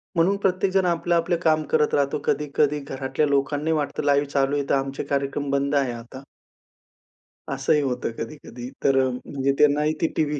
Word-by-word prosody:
म्हणून 175 +4 +3
प्रत्येकजण 190 -1 +1
आपलं-आपलं 170 0 +1
काम 155 -1 +3
करत 150 - +2
राहतो. 140 -1 +1
कधी-कधी 150 0 +1
घरातल्या 135 +1 -2
लोकांनाही 145 +3 0
वाटतं, 145 -1 -2
लाईव्ह 145 0 +2
चालू 140 0 +1
आहे, 145 -1 -1
तर - - +4
आमचे 135 +1 -2
कार्यक्रम 140 0 -2
बंद 140 +1 0
आहे 135 -3 +2
आता. 120 +3 -10 1.3
असंही 135 +2 +2
होतं 125 -3 -2
कधी-कधी, 125 -1 -7
तर 135 -1 +3
अं, 130 - -1
म्हणजे 140 -1 -1
त्यांना 150 0 +4
ही 155 +1 +1
ते 165 - +3
टीव्ही, 150 -2 0
145 Hz, 165 wpm, -24 LUFS, 135-155 Hz, 1.3 s, तर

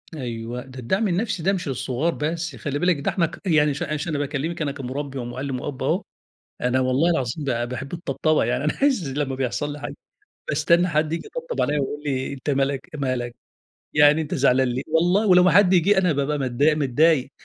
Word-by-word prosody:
أيوه، 120 -2 -5
ده 130 0 -11
الدعم 190 - 0
النَفسي 195 -1 -1
ده 195 +2 +2
مش 180 -5 -3
للصغار 135 +5 -1
بس، 160 0 -3
خلّي 145 0 -3
بالِك، 175 -4 +2
ده - - -1
إحنا 175 - +1
ك 165 - -8
يعني 150 -4 +3
ش 150 - -4
ش 150 +3 -4
أنا 150 -3 -1
باكلمك، 145 +4 -3
أنا 145 -2 0
كمُربّي 140 0 -5
ومُعلم 125 +2 -4
وأب 145 -3 -5
أهو، - - 0 0.6
أنا 125 +1 +1
والله 130 +6 +2
العظيم 135 0 -2
ب 120 -3 -1
باحب 135 +5 -6
الطبطبة، 155 -2 0
يعني 120 +4 -1
أنا 150 - +1
عايز 250 - +2
لمّا 135 -1 -2
بيحصَل 135 +3 -2
لي 150 - -9
حاجة - - -6 0.5
باستنى 170 +4 +3
حد 155 0 0
ييجي 165 - -3
يطبطب - - -5
عليَّ 150 0 +1
ويقول 145 +1 -3
لي 130 -1 -2
أنت 140 +2 -4
مالك 135 0 0
مالك؟ 130 -4 -2 0.6
يعني 150 +1 +6
أنت 150 - -4
زعلان 130 -2 +3
ليه؟ 125 +2 -2
والله، 175 +7 +2
ولو 180 -1 +6
ما 180 - +5
حد 185 +2 +5
جه 190 +3 +4
أنا 180 -4 +3
بابقى 145 +1 -1
متضايق 140 +4 +2
متضايق، 145 0 +2
145 Hz, 205 wpm, -23 LUFS, 130-165 Hz, 0.6 s, يعني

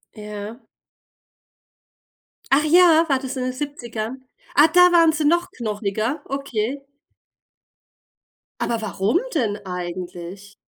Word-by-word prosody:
Ja. 210 +2 -8 1.9
Ach 280 +2 +4
ja, 335 0 +6
war 275 -2 +2
das 265 0 -6
in 255 - -2
den 255 0 -2
70ern? 255 -3 -6 0.3
Ah, 300 +2 +7
da 360 +2 +6
waren 335 -2 +5
sie 310 -1 -2
noch 345 +4 +2
knochiger, 220 +4 -3
okay. 275 -1 -3 1.8
Aber 230 -1 -1
warum 210 - 0 0.2
denn 220 -9 0
eigentlich? 180 +2 -7
250 Hz, 105 wpm, -22 LUFS, 210-295 Hz, 1.9 s, Ah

